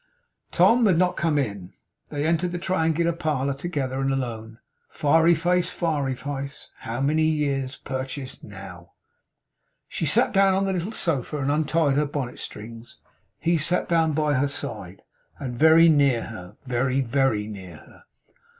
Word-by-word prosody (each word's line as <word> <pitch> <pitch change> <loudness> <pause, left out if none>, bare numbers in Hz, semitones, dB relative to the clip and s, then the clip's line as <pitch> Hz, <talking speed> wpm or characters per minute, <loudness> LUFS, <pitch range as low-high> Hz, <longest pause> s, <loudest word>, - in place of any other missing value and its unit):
Tom 235 -1 +4
had 185 -4 +3
not 180 +1 +2
come 160 -3 0
in. 100 -9 -3 0.4
They 145 0 -2
entered 170 +2 +1
the 175 - -3
triangular 170 -2 0
parlour 150 -5 -1
together, 135 -3 -3
and 135 0 +1
alone. 115 -4 -4 0.3
Fiery 165 +3 +3
Face, 180 +2 +1
Fiery 145 -6 -1
Face, 140 +1 -6
how 120 +3 -4
many 150 +3 +2
years' 140 -4 0
purchase 130 0 -6
NOW! 95 -3 -11 0.9
She - - -3
sat - - +2
down 195 -1 +4
on 195 +1 +1
the 195 - 0
little 185 +3 -3
sofa, 150 - -2
and 140 0 0
untied 150 -1 +1
her 150 0 +2
bonnet 135 -4 -4
strings. 115 +2 -9 0.4
He 170 0 +1
sat 175 +4 0
down 165 -2 +2
by 150 0 +1
her 140 +1 +2
side, 140 - -6 0.3
and 125 -3 -5
very 160 +4 +6
near 140 -7 +3
her; 105 -3 -10
very, 130 +1 0
very 130 -4 +1
near 95 -5 -9
her. - - -18
145 Hz, 155 wpm, -24 LUFS, 130-165 Hz, 0.9 s, very